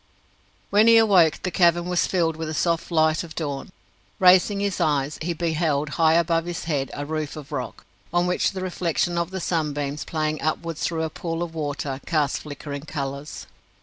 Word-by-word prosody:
When 210 +2 +5
he 230 0 +8
awoke 190 -8 +4
the 185 - -1
cavern 175 -1 +3
was 180 -1 +1
filled 165 -4 +1
with 160 0 -5
the 155 - -4
soft 170 0 0
light 160 -1 +2
of 160 -2 -10
dawn. 145 +1 -4 0.5
Raising 185 +2 +5
his 200 -2 -1
eyes, 145 -1 0
he 170 +2 -1
beheld, 155 -3 0
high 160 +1 +3
above 165 0 +2
his 175 -1 -4
head, 145 -5 -1
a 145 - -4
roof 155 -1 -3
of 150 -1 -10
rock, 130 -4 -5 0.3
on 175 +1 +2
which 180 +2 +1
the 190 - -5
reflection 175 -1 -1
of 170 0 -1
the 190 0 -4
sunbeams, 150 -4 -2
playing 155 -1 -2
upwards 160 0 -2
through 165 -1 -1
a 160 - -3
pool 165 +1 -3
of 170 -2 -6
water, 145 -3 -3
cast 150 -4 +1
flickering 145 -1 -7
colours. 140 -1 -5
160 Hz, 185 wpm, -24 LUFS, 150-175 Hz, 0.5 s, he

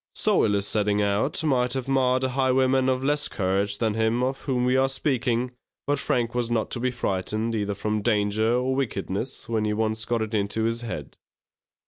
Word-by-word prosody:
So - - +3
ill 105 - +2
a 100 - +1
setting 105 0 +1
out 105 +10 +1
might 125 -5 +2
have 130 -1 -3
marred 130 -1 +2
a 130 - +1
highwayman 130 0 +2
of 130 0 0
less 145 +1 +1
courage 100 -1 0
than 110 -2 0
him 110 +2 +1
of 135 +1 -2
whom 125 -3 0
we 125 +1 +2
are 135 0 +3
speaking; 125 -3 0 0.3
but 145 0 0
Frank 120 -4 0
was 120 -1 -1
not 115 -2 -1
to - - -2
be 125 +1 +1
frightened 110 -1 -2
either 105 -2 -1
from 105 +2 -2
danger 105 0 +1
or 125 +2 +1
wickedness, 115 -2 -3
when 110 -2 0
he 105 0 0
once 110 0 -1
got 115 -2 0
it 110 0 -6
into 105 +1 0
his 115 +1 0
head. 110 - -6
115 Hz, 200 wpm, -25 LUFS, 105-130 Hz, 0.3 s, So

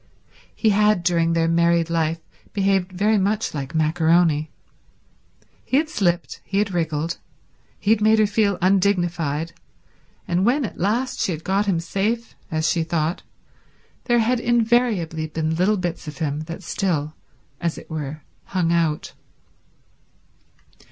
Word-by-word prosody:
He 220 - +2
had 210 -2 +3
during 170 -1 +2
their 165 0 +2
married 170 0 +3
life 165 -1 0 0.3
behaved 195 -2 +1
very 205 +3 +2
much 205 +3 0
like 140 +1 -5
maccaroni. 160 -1 +2 1.1
He 260 - +1
had 310 +1 +1
slipped, 175 - -1
he 195 - -3
had 200 -2 +1
wriggled, 165 -1 -1 0.6
he 205 - +1
had 220 -1 +3
made 220 +1 +5
her 215 - +5
feel 205 -2 +1
undignified, 175 -5 +1 0.7
and 180 +1 +1
when 255 +5 +2
at 205 - -8
last 230 +8 0
she - - +1
had 160 -1 -5
got 200 +2 0
him 180 -4 +2
safe, 210 +7 -2
as 160 0 0
she 170 - +1
thought, 160 0 -1 0.8
there 240 -1 +3
had 235 +2 +2
invariably 230 -9 +1
been 160 +1 -2
little 190 +5 +2
bits 175 -2 -4
of 150 -2 -7
him 150 +1 -2
that 165 +4 -7
still, 155 -5 -1 0.5
as 170 -2 -2
it - - -10
were, 155 -1 -5 0.2
hung 180 -3 0
out. 165 -3 0
175 Hz, 145 wpm, -22 LUFS, 160-205 Hz, 1.1 s, made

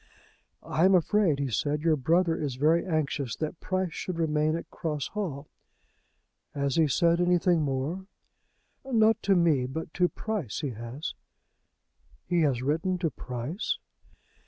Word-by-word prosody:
"I 160 - 0
am 190 0 +6
afraid," 185 -3 +3
he 140 -2 -2
said, 145 +7 -1
"your 165 -2 +4
brother 165 +5 +2
is 145 -5 -3
very 155 +5 +3
anxious 145 - -1
that 155 +1 -4
Price 185 -2 -2
should 180 -2 -4
remain 155 -1 +1
at 170 - -6
Cross 150 -4 -3
Hall." 155 -9 -4 1.1
"Has 140 -2 0
he 160 -2 +4
said 170 +5 +3
anything 175 -1 +3
more?" 150 +7 -2 0.8
"Not 225 -4 +3
to 195 -1 +3
me; 155 -8 +3
but 160 +4 -6
to 180 -1 +2
Price 210 - -4
he 145 -4 -2
has." 120 +7 -6 1.1
"He 175 -1 +1
has 130 -5 +1
written 165 +6 0
to 170 -3 -1
Price?" 125 - -4
160 Hz, 145 wpm, -28 LUFS, 140-180 Hz, 1.1 s, am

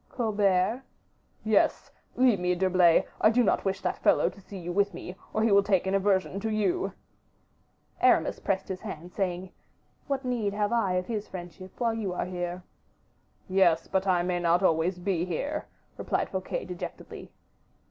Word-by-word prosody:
"Colbert?" 210 -1 +1 0.6
"Yes; 215 -2 +2 0.2
leave 250 -6 +4
me, 180 0 +1
D'Herblay; 180 -2 +4 0.2
I 215 - +6
do 245 +2 +3
not - - +1
wish 195 0 -1
that - - -2
fellow - - +3
to 200 - -15
see 195 +1 -10
you 175 -1 -5
with 200 -1 +1
me, 180 +1 -8 0.2
or 220 - 0
he 225 - +3
will 200 0 +6
take 195 -2 +1
an 190 - -1
aversion 195 -1 +1
to 220 - -2
you." 220 - 0 1.1
Aramis - - +3
pressed 195 -1 -1
his 185 -1 -5
hand, 180 -5 -7
saying, 185 -1 -3 0.6
"What 275 -1 -2
need 230 -5 -1
have 210 0 0
I 225 -6 +1
of 180 0 0
his 215 -1 -4
friendship, 185 +1 -10
while 235 -2 +1
you 210 -5 -3
are - - -2
here?" 180 0 -4 0.8
"Yes, 180 -4 +3
but 190 0 0
I 180 -2 +3
may 180 0 -1
not 175 +2 +2
always 175 +1 +2
be 180 -2 -1
here," 285 - -3 0.3
replied - - -1
Fouquet, 190 -1 -3
dejectedly. 180 -1 -8
190 Hz, 170 wpm, -28 LUFS, 180-210 Hz, 1.1 s, I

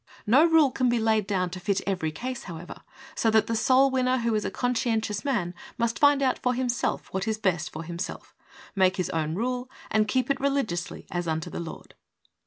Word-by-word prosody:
No 255 +8 +6
rule 320 -5 +5
can 255 -1 +1
be 240 - +2
laid 220 -2 +2
down 185 -3 0
to 185 - -6
fit 195 +2 0
every 180 -5 -1
case, 255 +10 -5
however, 170 0 -8 0.3
so 225 - +1
that 220 0 +4
the 230 - -2
soul 260 +4 +4
winner 255 0 +2
who 235 -2 0
is 215 -1 0
a - - -1
conscientious 225 -4 -1
man 210 -11 -1 0.2
must 235 -1 0
find 285 -1 +5
out 260 -1 +1
for 250 0 0
himself 245 -1 -2
what 190 +3 -2
is 220 -1 0
best 180 -7 0
for 155 - -6
himself, 170 +3 -6 0.4
make 190 -1 +3
his 185 0 -1
own 160 -2 -1
rule 250 +4 -2 0.2
and 215 -1 +3
keep 255 +5 +1
it 275 - 0
religiously 270 -12 -1
as 175 -1 -2
unto 160 0 -2
the - - -5
Lord. 170 -2 -8
220 Hz, 205 wpm, -26 LUFS, 185-255 Hz, 0.4 s, No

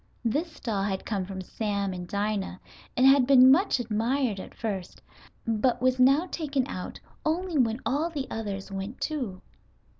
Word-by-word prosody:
This 300 +7 -1
doll 215 -5 -2
had 195 -1 -2
come 200 -4 -2
from 190 -1 -5
Sam 200 0 -2
and 180 -1 -6
Dinah 200 -1 -2 0.4
and 255 - +5
had 270 -2 +6
been 260 -1 +8
much 330 -1 +3
admired 230 0 0
at - - -9
first, 200 -6 -4 0.5
but 235 +2 +1
was 255 +1 +2
now 275 +6 +5
taken 290 -7 -2
out 185 -9 -6 0.2
only 330 0 0
when 230 -1 +2
all 300 +6 0
the 290 -5 -3
others 200 -3 -4
went 195 +4 -5
too. 250 -12 -3
235 Hz, 160 wpm, -27 LUFS, 200-275 Hz, 0.5 s, been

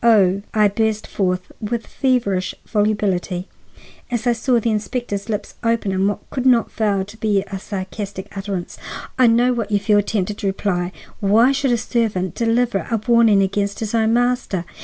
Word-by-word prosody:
Oh," 200 -4 +4
I 215 -1 +4
burst 215 +1 0
forth 185 -2 -2
with 225 +2 -2
feverish 230 -9 0
volubility, 205 -4 0 0.6
as 240 -1 -2
I 240 - +4
saw 235 +1 +2
the 230 0 0
inspector's 215 -1 -3
lips 210 -1 -3
open 230 -3 +1
in 190 +1 +1
what 205 - -3
could 260 -1 -1
not 240 -3 +4
fail 200 -4 0
to 205 +3 -13
be 210 -3 +1
a 195 -1 -6
sarcastic 195 0 -6
utterance, 195 -3 -5 0.4
"I 255 - +7
know 240 +2 +4
what 230 -3 -2
you 205 - +2
feel 205 +1 +3
tempted 205 0 -2
to 200 - -1
reply. 185 -2 -1 0.3
Why 225 +5 +4
should 275 -1 +1
a 240 - +3
servant 220 -6 -1
deliver 230 -2 +1
a 230 - +1
warning 230 -4 +5
against 200 +1 -1
his 220 0 -3
own 225 -1 +2
master? 245 -7 0
210 Hz, 175 wpm, -20 LUFS, 195-235 Hz, 0.6 s, I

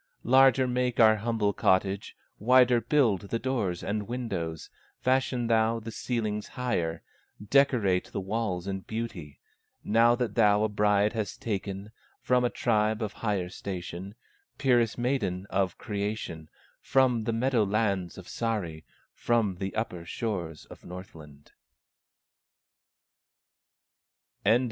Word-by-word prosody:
Larger 130 +1 +5
make 125 -1 -1
our 110 -1 +7
humble 110 -2 0
cottage, 95 +1 +1 0.2
Wider 125 +1 +5
build 110 - +1
the 115 - 0
doors 115 -9 -2
and 105 0 -2
windows, 95 -10 -4 0.3
Fashion 130 -1 +1
thou 115 0 +2
the 115 +1 -7
ceilings 110 -3 -2
higher, 85 -10 -2 0.5
Decorate 120 -10 +3
the - - -3
walls 95 -2 -2
in 95 0 -2
beauty, 95 - -6 0.5
Now 115 +2 +4
that 120 -2 -2
thou 105 -2 +4
a 110 - +1
bride 105 0 +2
hast 110 -4 -4
taken 100 -1 -4 0.3
From 125 -1 +2
a 120 - +2
tribe 110 -2 +1
of 105 - -4
higher 100 -5 -2
station, 95 +1 -6 0.4
Purest 120 -5 +2
maiden 110 -8 -1
of 95 -1 0
creation, 100 -7 -4 0.3
From 125 -4 +2
the 115 - 0
meadow 120 0 +2
lands 100 -4 0
of 95 - -9
Sahri, 95 -10 -3 0.3
From 110 -6 0
the 95 +1 -4
upper 100 -6 -3
shores 85 -4 -4
of - - -14
Northland." 80 -6 -11
105 Hz, 120 wpm, -28 LUFS, 95-120 Hz, 0.5 s, our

